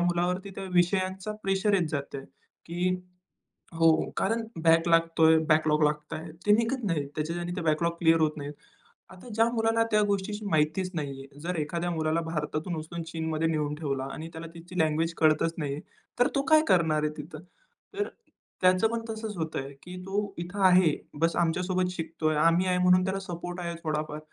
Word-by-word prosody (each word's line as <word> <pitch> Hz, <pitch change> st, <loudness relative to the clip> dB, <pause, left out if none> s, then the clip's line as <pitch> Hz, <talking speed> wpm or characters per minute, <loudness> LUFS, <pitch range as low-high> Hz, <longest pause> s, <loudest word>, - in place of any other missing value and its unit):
मुलावरती 175 Hz, +2 st, 0 dB
त्या 195 Hz, -, -5 dB
विषयांचा 185 Hz, +3 st, +1 dB
प्रेशर 195 Hz, +1 st, +1 dB
येत 175 Hz, -4 st, +2 dB
जातं 140 Hz, -2 st, -4 dB
आहे, 135 Hz, -, -10 dB, 0.4 s
की 175 Hz, +2 st, 0 dB, 0.9 s
हो 165 Hz, -1 st, +4 dB
कारण 225 Hz, +3 st, +1 dB, 0.2 s
बॅक 165 Hz, +1 st, +5 dB
लागत 165 Hz, 0 st, +2 dB
आहे 160 Hz, 0 st, +7 dB
बॅकलॉग 155 Hz, 0 st, +3 dB
लागतं 150 Hz, 0 st, -1 dB
आहे, 160 Hz, 0 st, -8 dB
ते 210 Hz, -, +6 dB
निघत 230 Hz, +3 st, +1 dB
नाहीत 150 Hz, -7 st, -1 dB
त्याच्या. 155 Hz, +3 st, -2 dB
आणि 175 Hz, 0 st, -4 dB
ते -, -, -2 dB
बॅकलॉग 165 Hz, +2 st, +1 dB
क्लिअर 165 Hz, -1 st, +4 dB
होत 155 Hz, -1 st, +3 dB
नाहीत. 145 Hz, 0 st, -5 dB, 0.6 s
आता 190 Hz, +6 st, -13 dB
ज्या 225 Hz, 0 st, +4 dB
मुलाला 225 Hz, 0 st, +2 dB
त्या 210 Hz, 0 st, +4 dB
गोष्टीची 205 Hz, +1 st, -2 dB
माहितीच 155 Hz, +4 st, +1 dB
नाही 140 Hz, -3 st, -4 dB
आहे, 140 Hz, +1 st, -16 dB
जर 180 Hz, +3 st, -3 dB
एखाद्या 170 Hz, +3 st, -2 dB
मुलाला 160 Hz, 0 st, 0 dB
भारतातून 160 Hz, +1 st, -3 dB
उचलून 165 Hz, +2 st, -5 dB
चीनमध्ये 160 Hz, 0 st, -1 dB
नेऊन 150 Hz, -2 st, -1 dB
ठेवला 140 Hz, -4 st, -3 dB
आणि 160 Hz, +1 st, -7 dB
त्याला 165 Hz, +1 st, -7 dB
तिची 175 Hz, +2 st, -7 dB
लँग्वेज 160 Hz, +1 st, +1 dB
कळतच 155 Hz, +1 st, +3 dB
नाही 145 Hz, -3 st, -2 dB
आहे, 150 Hz, -, -6 dB, 0.4 s
तर 245 Hz, -, +5 dB
तो 275 Hz, -, +3 dB
काय 310 Hz, 0 st, +8 dB
करणार 160 Hz, -4 st, +3 dB
आहे 150 Hz, -, 0 dB
तिथं. 155 Hz, +1 st, -8 dB, 0.5 s
तर 410 Hz, +1 st, -1 dB, 0.5 s
त्याचं 185 Hz, +4 st, +4 dB
पण 230 Hz, 0 st, -2 dB
तसंच 220 Hz, -2 st, -5 dB
होतं 160 Hz, -3 st, -2 dB
आहे, 140 Hz, +1 st, -9 dB
की 180 Hz, 0 st, -9 dB
तो 200 Hz, +1 st, -2 dB
इथं 180 Hz, +4 st, -5 dB
आहे 180 Hz, -4 st, +5 dB, 0.3 s
बस 165 Hz, 0 st, +2 dB
आमच्यासोबत 180 Hz, +2 st, +1 dB
शिकत 165 Hz, -2 st, -7 dB
आहे 155 Hz, -, 0 dB
आम्ही 170 Hz, +2 st, +4 dB
आहे 180 Hz, 0 st, +2 dB
म्हणून 180 Hz, 0 st, +5 dB
त्याला 190 Hz, +1 st, -1 dB
सपोर्ट 175 Hz, -1 st, -6 dB
आहे 170 Hz, -1 st, -4 dB
थोडाफार, 155 Hz, -1 st, -2 dB
170 Hz, 185 wpm, -28 LUFS, 155-185 Hz, 0.9 s, काय